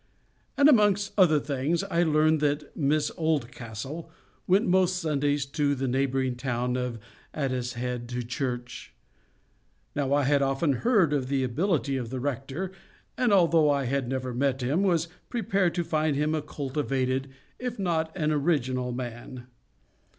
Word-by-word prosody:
And 285 - +6
amongst 205 -7 +4
other 170 -7 +5
things, 145 +5 -1
I 175 -4 0
learned 155 -1 +3
that 145 0 -1
Miss 150 0 +1
Oldcastle 140 -1 -3 0.4
went 190 +4 +4
most 185 0 +3
Sundays 145 -4 0
to 145 +1 0
the 135 0 -2
neighbouring 130 0 0
town 125 -1 -1
of 125 -2 -2 0.4
Addicehead 125 -3 -3
to 125 0 -3
church. 120 0 -5 1.0
Now 140 -2 -1
I 145 0 +3
had 140 +1 +3
often 135 +2 +1
heard 205 - +3
of 135 -3 0
the 135 -1 0
ability 140 +1 0
of 120 -3 -4
the 130 +1 -4
rector, 140 +7 -3 0.4
and 250 -3 +1
although 170 -5 +5
I 140 -2 +1
had 135 0 -1
never 130 -1 -3
met 135 0 0
him, 145 +9 +1
was 170 -4 +2 0.2
prepared 200 -7 0
to 175 - 0
find 155 -2 0
him 150 +2 +1
a 155 - 0
cultivated, 135 -2 -2 0.3
if 250 -1 -4
not 165 -5 0
an 155 -3 +1
original 130 -5 0
man. 120 0 -6
145 Hz, 150 wpm, -27 LUFS, 130-165 Hz, 1.0 s, And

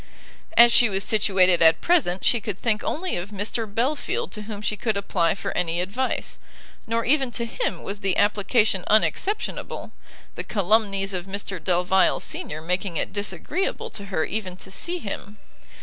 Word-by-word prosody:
As 235 0 +9
she 240 - +6
was 195 0 -1
situated 190 -5 +3
at 160 0 +6
present, 265 - +1
she 240 -3 +3
could 210 -3 -4
think 215 -3 0
only 365 +4 -2
of 175 +3 -5
Mr 210 +2 -3
Belfield 295 - -1
to 215 - -4
whom 210 -1 -7
she 210 - 0
could 215 0 -1
apply 175 -4 +1
for - - -5
any 170 -1 0
advice. 210 +9 -2 0.5
Nor 230 0 0
even 270 0 +2
to 235 - -2
him 485 - -3
was 200 +1 -5
the 195 -2 0
application 205 -1 +2
unexceptionable, 395 - 0 0.4
the - - -5
calumnies 200 -1 +1
of 180 0 -4
Mr 195 -3 -5
Delvile 180 +1 +3
senior 155 +1 -5
making 180 0 -1
it - - -2
disagreeable 205 - -2
to 200 - -6
her 185 -5 -1
even 190 -4 -4
to 190 - -9
see 345 - -2
him. 210 - -7
205 Hz, 165 wpm, -24 LUFS, 185-230 Hz, 0.5 s, As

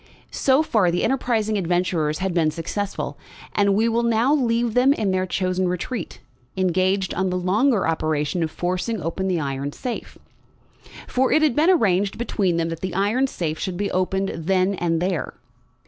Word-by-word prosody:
So 270 +3 +3
far, 215 - +2
the 175 +1 0
enterprising 225 -5 0
adventurers 170 -4 0
had 190 -1 -2
been 165 -3 +2
successful, 180 +6 -4 0.3
and 200 -1 +3
we 220 +3 +2
will 230 +1 +1
now 235 +4 +2
leave 235 -4 +1
them 255 +3 +4
in 210 -8 -1
their 185 0 0
chosen 185 0 0
retreat, 180 +4 -4 0.4
engaged 185 +1 +1
on 190 +1 0
the 180 - -1
longer 205 +5 +2
operation 155 +1 -1
of 160 - 0
forcing 185 +7 -2
open 170 +3 -3
the 180 -3 0
iron 140 0 -3
safe. 245 -2 -6 0.9
For 260 +1 +1
it 310 - +4
had 290 -6 +3
been 315 +4 +4
arranged 200 - +2
between 195 -7 0
them 165 0 0
that 165 -1 -5
the 185 0 -4
iron 215 +8 +2
safe 160 -10 -3
should 185 -2 -3
be 200 +1 -2
opened 190 +1 0
then 185 +3 +1
and 170 -2 -1
there. 180 -3 -2
190 Hz, 175 wpm, -22 LUFS, 175-225 Hz, 0.9 s, them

